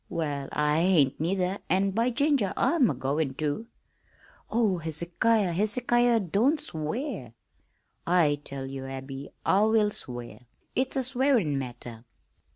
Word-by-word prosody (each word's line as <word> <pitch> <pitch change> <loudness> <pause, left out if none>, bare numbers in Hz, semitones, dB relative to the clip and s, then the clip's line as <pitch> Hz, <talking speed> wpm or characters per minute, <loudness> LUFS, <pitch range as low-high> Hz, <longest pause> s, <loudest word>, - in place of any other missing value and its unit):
"Well, 145 -5 -3
I 150 +1 +1
hain't 165 -7 +3
neither, 185 +3 0
an', 195 +2 +2
by 230 +5 +1
ginger, 250 -6 +1
I'm 305 -9 +3
agoin' 135 0 -1
to!" 155 +10 -2 0.8
"Oh, 215 -6 +1
Hezekiah, 170 +6 +1
Hezekiah, 235 +5 +2
don't 220 - +2
swear!" 160 - -3 0.7
"I 155 -5 +3
tell 135 -2 -6
ye, 135 0 -6
Abby, 135 +1 -7 0.2
I 195 - +4
will 215 -1 +3
swear. 120 -5 -6 0.3
It's 260 +1 0
a 265 - +1
swearin' 250 - +2
matter. 120 -3 -6
180 Hz, 125 wpm, -27 LUFS, 145-230 Hz, 0.8 s, I